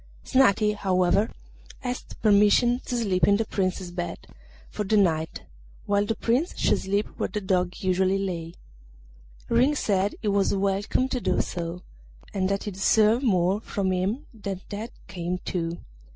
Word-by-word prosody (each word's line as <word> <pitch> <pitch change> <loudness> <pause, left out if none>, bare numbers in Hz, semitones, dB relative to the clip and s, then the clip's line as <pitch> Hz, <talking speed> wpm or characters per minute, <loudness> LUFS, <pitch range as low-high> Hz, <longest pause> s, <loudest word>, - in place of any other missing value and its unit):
Snati, 215 -5 +3
however, 190 +1 +2 0.5
asked 250 -1 -5
permission 215 +4 +4
to 245 - -1
sleep 195 -6 +2
in 200 - +5
the 225 - 0
Prince's 185 -3 -2
bed 175 -1 -5 0.4
for 210 - -4
that 210 +2 +2
night, 160 -5 +1 0.4
while 205 0 +1
the 225 - 0
Prince 255 - 0
should - - +2
sleep 200 +2 0
where - - -1
the 210 - -3
Dog 185 -2 0
usually 190 +1 +2
lay. 175 -4 -4 0.9
Ring 255 +6 +3
said 200 -5 0
he - - -1
was 200 0 +2
welcome 200 +6 0
to 250 -2 -2
do - - +1
so, 170 0 -5 0.5
and 190 -1 0
that 200 0 -1
he 210 - -4
deserved 215 +5 +3
more 190 -3 +2
from 195 -4 -2
him 190 +8 -1
than 200 -4 -5
that 215 +3 -5 0.2
came 180 0 -3
to. 170 -1 -2
200 Hz, 155 wpm, -26 LUFS, 185-215 Hz, 0.9 s, in